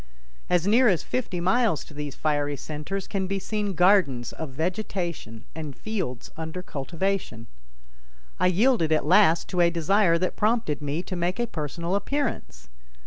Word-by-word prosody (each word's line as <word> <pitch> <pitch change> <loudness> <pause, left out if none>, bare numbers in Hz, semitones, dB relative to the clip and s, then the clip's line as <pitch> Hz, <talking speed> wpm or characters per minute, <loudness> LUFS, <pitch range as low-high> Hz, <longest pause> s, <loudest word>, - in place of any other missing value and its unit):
As 180 -1 +2
near 235 +5 +5
as 185 -6 +2
fifty 215 -8 -2
miles 190 0 +2
to - - -14
these 145 -1 -5
fiery 145 -1 0
centers 155 +8 -5
can 190 -2 -2
be 195 +1 -1
seen 205 0 -2
gardens 180 -9 +3
of 160 - -6
vegetation 170 - -4
and 150 -4 -6
fields 185 - -4
under 160 +3 -5
cultivation. 170 -5 -3 0.9
I 180 - +4
yielded 190 -2 +3
at 155 - +2
last 170 -1 +5
to 180 - +1
a 170 - +5
desire 170 +2 +3
that 185 +2 -1
prompted 215 - 0
me 145 +4 -2
to 185 - -5
make 175 +4 -1
a 240 - +2
personal 170 - -4
appearance. 200 - -2
175 Hz, 155 wpm, -26 LUFS, 150-200 Hz, 0.9 s, near